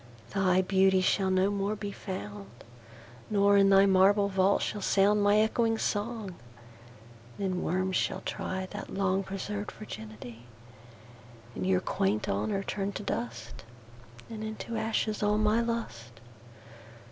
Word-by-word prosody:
Thy 185 -1 +3
Beauty 190 0 +3
shall 190 +1 +1
no 190 +1 +2
more 200 +1 -1
be 205 -1 -5
found; 105 - -7 0.8
Nor, 200 -1 +4
in 195 0 +5
thy 195 0 +6
marble 200 +1 +4
Vault, 195 +1 +2
shall 210 - -3
soundMy 205 +2 +3
ecchoing 225 0 0
Song: 210 -2 -2 1.0
then 185 -2 -2
Worms 185 +1 0
shall 190 - -1
tryThat 190 0 -5
long 195 0 +1
preserv'd 200 +2 -5
Virginity:And 115 - -11
your 95 -1 +2
quaint 105 +2 -1
Honour 110 - -1
turn 195 0 -3
to 205 - -6
dust; 120 - -5 0.6
And 220 -1 -7
into 220 +1 -5
ashes 220 -1 -1
all 210 0 +2
my 215 +2 +2
Lust. 120 - -5
195 Hz, 125 wpm, -29 LUFS, -, 1.0 s, thy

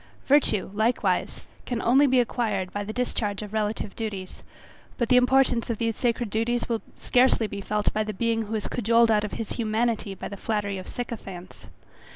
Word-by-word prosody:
Virtue 260 -10 +3
likewise 220 +4 0 0.3
can 245 -2 -1
only 270 +5 +4
be 260 -1 +4
acquired 215 -6 -1
by 205 - -2
the 205 - -5
discharge 215 -4 -2
of 210 0 -9
relative 210 -1 -2
duties; 200 -5 -5 0.6
but 235 -3 0
the 250 - +5
importance 250 -1 +3
of 230 - -1
these 230 0 -1
sacred 240 -3 -1
duties 235 +2 0
will 230 -2 -1 0.2
scarcely 250 -2 +3
be 200 -1 -5
felt 210 +1 0
by 215 - +1
the 215 - -4
being 225 +2 0
who 220 - -3
is 215 - -2
cajoled 230 0 +3
out 210 -1 +3
of 210 - -4
his 225 - -5
humanity 220 -2 -1
by - - -6
the 200 - -7
flattery 205 -2 -2
of 185 - -9
sycophants. 195 -7 -7
225 Hz, 190 wpm, -26 LUFS, 210-240 Hz, 0.6 s, the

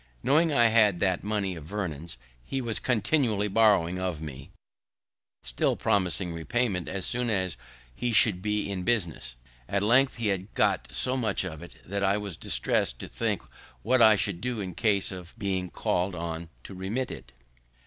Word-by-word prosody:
Knowing 155 +6 +3
I 120 -5 +5
had 105 -5 +4
that 95 -2 +1
money 100 -3 -1
of 80 -3 -9
Vernon's, 85 -6 -5 0.3
he 135 - -3
was 120 -4 -2
continually 115 -3 +1
borrowing 100 -4 +3
of 90 -4 -2
me, 70 -4 -8 0.9
still - - 0
promising 90 -2 0
repayment 90 +2 -1
as 95 -1 -3
soon 125 0 -1
as 95 -4 0 0.4
he 120 - -2
should 110 -5 +4
be 105 0 -1
in 100 -2 -3
business. 90 - -1 0.3
At 100 0 0
length 125 +5 +4
he 115 -2 -1
had 95 0 -2
got 60 - +2
so 100 - 0
much 110 -7 0
of 85 -4 -6
it 85 - -11
that 100 +2 -3
I 100 +1 +3
was 100 -4 -5
distress'd - - 0
to - - -7
think - - -2 0.4
what 125 +3 +3
I 110 -1 +8
should 100 -3 -1
do 125 -2 -2
in 95 -3 -4
case 100 0 +2
of 90 +2 -9
being 95 -4 -2
call'd 90 +2 -1
on 85 -1 -5
to - - -9
remit 100 +8 -3
it. - - -10
100 Hz, 175 wpm, -27 LUFS, 90-110 Hz, 0.9 s, I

